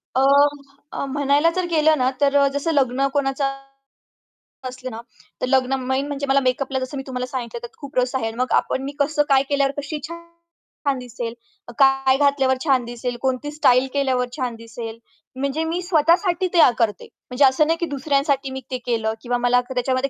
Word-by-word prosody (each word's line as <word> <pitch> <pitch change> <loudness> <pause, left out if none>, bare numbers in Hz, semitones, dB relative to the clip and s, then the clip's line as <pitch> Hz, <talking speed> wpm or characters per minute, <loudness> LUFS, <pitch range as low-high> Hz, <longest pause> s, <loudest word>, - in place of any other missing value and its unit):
अ, 260 - +3 0.7
अ, - - -3
म्हणायला 290 +3 +3
जर 370 -1 0
गेलं 315 -1 +3
ना, 255 -1 +2
तर 280 0 +3
अ, 280 - +5
जसं 285 +3 -1
लग्न 270 -1 +2
कोणाचा 275 -1 0 1.2
असलं 255 0 -7
ना 225 - -7 0.4
तर - - +1
लग्न 265 0 +2
मेन 265 +2 -1
म्हणजे 285 -1 -3
मला 270 +1 +4
मेकअपला 265 +1 0
जसं 260 +2 -5
मी 270 - -4
तुम्हाला 250 -1 -3
सांगितलं 240 -2 -5
त्यात 240 - -10
खूप 280 -1 -9
रस 250 +1 +1
आहे. 255 - -1
आणि 225 - -6
मग 255 +1 -1
आपण 265 - +1
मी 280 - -4
कसं 295 +1 +2
काय 270 0 +5
केल्यावर 280 -1 +2
कशी 295 +1 -4
छान 335 0 -7 0.7
छान 275 - +2
दिसेल? 240 -1 -6 0.5
काय 270 -1 +4
घातल्यावर 280 -2 +2
छान 265 -4 +3
दिसेल? 240 +1 -4
कोणती 265 +2 -1
स्टाईल 265 -3 +3
केल्यावर 260 -3 +1
छान 250 -3 -2
दिसेल? 230 0 -8 0.4
म्हणजे 280 +4 -2
मी 335 +3 -2
स्वतःसाठी 350 +2 +2
ते 345 - +3
अ, - - +8
करते. 210 -5 0 0.2
म्हणजे 260 +3 +4
असं 265 +3 +3
नाही 330 +1 +1
की 340 - 0
दुसऱ्यांसाठी 275 -1 0
मी 265 - -5
ते 255 - -1
केलं 225 -2 0
किंवा 245 0 -1
मला 245 +1 +3
त्याच्यामध्ये 255 +2 0
270 Hz, 190 wpm, -22 LUFS, 250-285 Hz, 1.2 s, अ